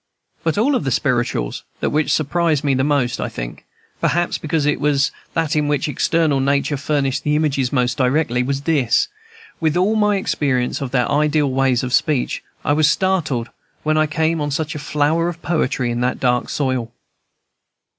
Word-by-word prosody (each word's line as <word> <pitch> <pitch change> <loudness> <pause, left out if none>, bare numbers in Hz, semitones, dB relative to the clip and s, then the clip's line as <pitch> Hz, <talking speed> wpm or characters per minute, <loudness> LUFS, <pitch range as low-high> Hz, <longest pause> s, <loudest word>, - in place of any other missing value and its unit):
But 160 +1 0
of 220 - +3
all 275 -2 +2
the 140 - -2
"spirituals" 120 - -1 0.2
that - - -1
which 150 +1 +1
surprised 155 0 +1
me 140 -2 +2
the 130 0 +1
most, 140 -4 +1
I - - -2
think, - - -7 0.3
perhaps 175 +1 0
because 155 -1 -1
it 150 - +1
was 145 -1 +2 0.2
that 160 -2 0
in 150 -1 +1
which 145 0 0
external 155 -1 +1
nature 140 +2 +1
furnished 140 -1 -1
the 150 0 +1
images 140 -5 0
most 125 -3 0
directly, 130 -1 +1
was 135 +2 -1
this. 140 - +2 0.5
With 160 0 +1
all 195 +5 +2
my 210 -1 +3
experience 140 -10 -1
of 135 - -3
their 125 -1 +1
ideal 150 0 +2
ways 130 -2 +2
of 125 0 -3
speech, 135 0 +1 0.2
I 145 - +3
was 150 0 +4
startled 150 -10 0 0.3
when 155 0 +1
first 155 - +4
I 150 - -9
came 160 0 +1
on 145 - -1
such 155 +3 -2
a 150 - -5
flower 150 +3 +1
of 170 -1 -8
poetry 130 -7 0
in 120 +1 -2
that 125 +1 0
dark 125 -1 +1
soil. 130 -5 -1
145 Hz, 185 wpm, -20 LUFS, 130-155 Hz, 0.5 s, was